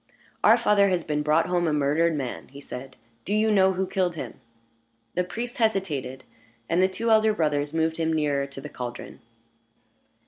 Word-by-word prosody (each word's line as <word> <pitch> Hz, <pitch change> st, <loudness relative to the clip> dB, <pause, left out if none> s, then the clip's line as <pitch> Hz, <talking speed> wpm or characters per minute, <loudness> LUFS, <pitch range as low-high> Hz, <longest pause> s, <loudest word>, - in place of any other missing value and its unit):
"Our -, -, +7 dB
father 200 Hz, -1 st, +3 dB
has 180 Hz, -3 st, 0 dB
been 150 Hz, -1 st, -1 dB
brought 155 Hz, +2 st, +2 dB
home 175 Hz, -1 st, 0 dB
a 155 Hz, -, +1 dB
murdered 150 Hz, +3 st, +2 dB
man," 135 Hz, -4 st, -5 dB
he 140 Hz, +2 st, -12 dB
said. 135 Hz, -1 st, -9 dB, 0.3 s
"Do 205 Hz, -, -1 dB
you 215 Hz, +1 st, +2 dB
know 190 Hz, -2 st, +4 dB
who 190 Hz, +1 st, -1 dB
killed 180 Hz, -2 st, -1 dB
him?" -, -, -7 dB, 0.7 s
The 180 Hz, -, +1 dB
priest 235 Hz, +7 st, -6 dB
hesitated, 165 Hz, -, -1 dB, 0.4 s
and 170 Hz, +2 st, +2 dB
the 185 Hz, -, +5 dB
two 225 Hz, +5 st, -2 dB
elder 220 Hz, -1 st, +4 dB
brothers 145 Hz, -3 st, 0 dB
moved 160 Hz, 0 st, 0 dB
him 160 Hz, -1 st, 0 dB
nearer 145 Hz, -3 st, 0 dB
to 140 Hz, 0 st, -9 dB
the -, -, -7 dB
caldron. 120 Hz, -1 st, -7 dB
165 Hz, 180 wpm, -25 LUFS, 145-190 Hz, 0.7 s, Our